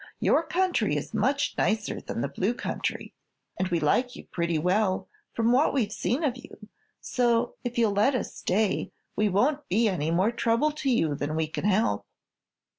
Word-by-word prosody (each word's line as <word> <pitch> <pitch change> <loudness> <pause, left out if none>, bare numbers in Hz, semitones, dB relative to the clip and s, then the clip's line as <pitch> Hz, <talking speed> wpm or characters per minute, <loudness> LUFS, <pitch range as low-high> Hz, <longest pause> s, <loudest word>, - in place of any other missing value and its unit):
Your - - +3
country 355 +3 0
is - - -5
much 285 +1 +1
nicer 215 -1 0
than - - -4
the 140 - 0
Blue 190 - -1
Country, - - -4 0.5
and 190 - +1
we 175 -2 0
like 245 - +1
you - - -10
pretty 170 -2 -2
well, 185 +4 +1 0.3
from 230 0 +2
what 275 +4 +3
we've 225 -6 +1
seen 250 +7 -1
of 260 -4 0
you; 215 -4 -13 0.3
so, 240 -1 +1
if 245 -1 -4
you'll 225 -3 +3
let 215 +7 +3
us 250 - -3
stay, 205 +2 0 0.2
we 210 0 +2
won't 275 +10 +1
be 220 +5 +2
any 165 -6 -1
more 185 +7 +2
trouble 235 +5 +1
to 290 -2 -3
you 165 - +2
than 145 +2 -3
we 160 0 +1
can 155 +4 -5
help." 195 - +1
220 Hz, 185 wpm, -27 LUFS, 185-250 Hz, 0.5 s, Your